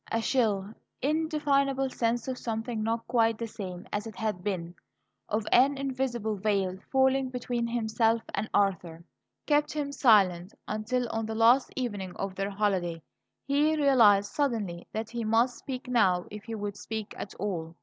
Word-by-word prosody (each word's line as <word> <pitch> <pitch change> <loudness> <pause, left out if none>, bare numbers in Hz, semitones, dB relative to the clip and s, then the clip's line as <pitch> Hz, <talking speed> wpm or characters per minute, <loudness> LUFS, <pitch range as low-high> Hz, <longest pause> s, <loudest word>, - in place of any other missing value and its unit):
A 230 - +1
chill, 215 -5 0 0.3
indefinable 280 -3 +1
sense 235 0 -1
of 255 -1 -3
something 225 0 -3
not 225 +1 -1
quite 225 -2 +2
the 230 - -3
same 185 -5 -7
as 210 +2 -2
it 220 - -9
had 210 -5 -3
been, 175 -4 -3 0.6
of 215 0 -1
an 275 +3 +5
invisible 255 -5 -2
veil 195 -2 0
falling 265 0 +3
between 245 -2 -2
himself 225 -1 +1
and 215 - -2
Arthur, 175 -4 0 0.4
kept 295 0 +2
him 290 -2 -2
silent, 195 -9 +3
until, 235 +4 -1
on 225 -1 -2
the 220 - -4
last 235 +4 +4
evening 205 -8 -4
of 195 -1 -4
their 195 +1 -2
holiday, 190 -5 0 0.5
he 295 +3 +2
realized 225 -9 +5
suddenly 220 -12 -1
that 220 +1 -4
he 235 -1 -3
must 230 +3 +2
speak 255 -1 -6
now 190 -8 +3
if 210 0 -8
he 230 -1 -5
would 205 -1 -4
speak 220 -1 -5
at 195 - -7
all. 170 -5 -4
225 Hz, 160 wpm, -28 LUFS, 200-255 Hz, 0.6 s, an